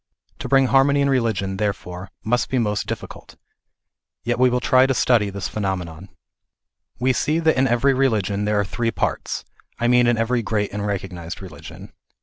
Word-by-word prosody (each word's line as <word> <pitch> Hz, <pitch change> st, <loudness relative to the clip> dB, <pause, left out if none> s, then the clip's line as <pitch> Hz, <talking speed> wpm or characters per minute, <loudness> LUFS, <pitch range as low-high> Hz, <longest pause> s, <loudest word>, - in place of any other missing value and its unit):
To -, -, -5 dB
bring 135 Hz, -1 st, +5 dB
harmony 140 Hz, +2 st, +3 dB
in 140 Hz, 0 st, +2 dB
religion, 105 Hz, -7 st, 0 dB
therefore, 95 Hz, -3 st, -4 dB
must 120 Hz, +3 st, 0 dB
be 130 Hz, -, 0 dB
most 105 Hz, -4 st, -1 dB
difficult. -, -, -7 dB, 0.9 s
Yet 120 Hz, +1 st, -1 dB
we 130 Hz, 0 st, +5 dB
will 125 Hz, 0 st, +1 dB
try 130 Hz, +1 st, +4 dB
to 135 Hz, -, 0 dB
study 115 Hz, -5 st, +3 dB
this 100 Hz, -2 st, -4 dB
phenomenon. 95 Hz, -3 st, -4 dB, 0.9 s
We 130 Hz, +2 st, +2 dB
see 150 Hz, +5 st, 0 dB
that 160 Hz, -1 st, +2 dB
in 130 Hz, +1 st, +2 dB
every 125 Hz, +3 st, +3 dB
religion 105 Hz, -6 st, 0 dB
there 105 Hz, 0 st, +1 dB
are 100 Hz, -, +1 dB
three 115 Hz, +3 st, -2 dB
parts -, -, -2 dB
ŌĆö -, -, -35 dB
I 120 Hz, -, +2 dB
mean 125 Hz, 0 st, +4 dB
in 120 Hz, -1 st, +2 dB
every 120 Hz, +2 st, +1 dB
great 105 Hz, -2 st, -2 dB
and 105 Hz, 0 st, -3 dB
recognized 90 Hz, -4 st, -5 dB
religion. 95 Hz, -2 st, -11 dB
115 Hz, 180 wpm, -22 LUFS, 100-130 Hz, 0.9 s, bring